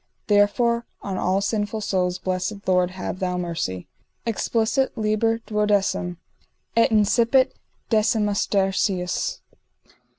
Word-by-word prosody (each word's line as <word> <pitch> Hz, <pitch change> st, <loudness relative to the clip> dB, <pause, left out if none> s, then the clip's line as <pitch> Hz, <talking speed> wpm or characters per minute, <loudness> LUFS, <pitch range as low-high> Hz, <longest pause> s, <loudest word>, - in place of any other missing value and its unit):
Therefore 235 Hz, +3 st, +2 dB, 0.2 s
on 190 Hz, -2 st, -3 dB
all 190 Hz, +2 st, +1 dB
sinful 210 Hz, +1 st, -1 dB
souls 180 Hz, -3 st, 0 dB
blessed 185 Hz, +2 st, -3 dB
Lord 180 Hz, -1 st, +3 dB
have 185 Hz, 0 st, -5 dB
thou 180 Hz, -1 st, -1 dB
mercy._ 165 Hz, -, -3 dB, 0.4 s
_Explicit 230 Hz, +3 st, +1 dB
liber 225 Hz, +1 st, +1 dB
xii. 205 Hz, -4 st, +1 dB, 0.6 s
Et 230 Hz, +3 st, +5 dB
incipit 230 Hz, +4 st, +3 dB, 0.4 s
Decimustercius. 205 Hz, -, +1 dB
205 Hz, 95 wpm, -23 LUFS, 185-225 Hz, 0.6 s, Et